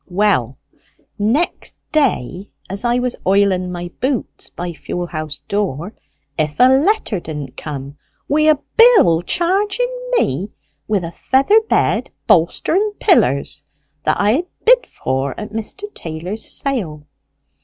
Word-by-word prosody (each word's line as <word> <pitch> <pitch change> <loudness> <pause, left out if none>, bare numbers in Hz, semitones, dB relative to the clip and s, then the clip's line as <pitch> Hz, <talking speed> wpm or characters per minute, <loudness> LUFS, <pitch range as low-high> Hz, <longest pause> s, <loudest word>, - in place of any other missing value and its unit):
Well, 180 - +1 0.6
next 240 +12 0
day, 205 - 0 0.2
as 195 +3 -3
I 240 0 +2
was 250 0 -1
oilen 190 -1 +2
my 175 0 -6
boots 260 -2 -2
by 175 0 -5
fuel 175 +2 -4
house 155 -3 -6
door, 200 - -2 0.5
if 150 -1 -1
a - - +7
letter 275 - +2
didn't 150 -5 -7
come 140 -1 -7 0.3
wi' 305 +2 +3
a 310 - +6 0.2
bill 450 - +6
charging 395 - 0 0.2
me 165 +11 0 0.4
with 205 -4 0
a 165 - -5
feather 275 - +3
bed, - - +1 0.2
bolster, 170 - +2
and 415 +3 +1
pillers, 140 - +2 0.4
that 155 - +1
I 205 +1 +3
had 325 +10 0 0.2
bid - - +5
for 130 +1 -3
at 210 0 -7
Mr. 225 - -4
Taylor's 170 +6 -5
sale. 180 - -2
200 Hz, 135 wpm, -18 LUFS, -, 0.6 s, a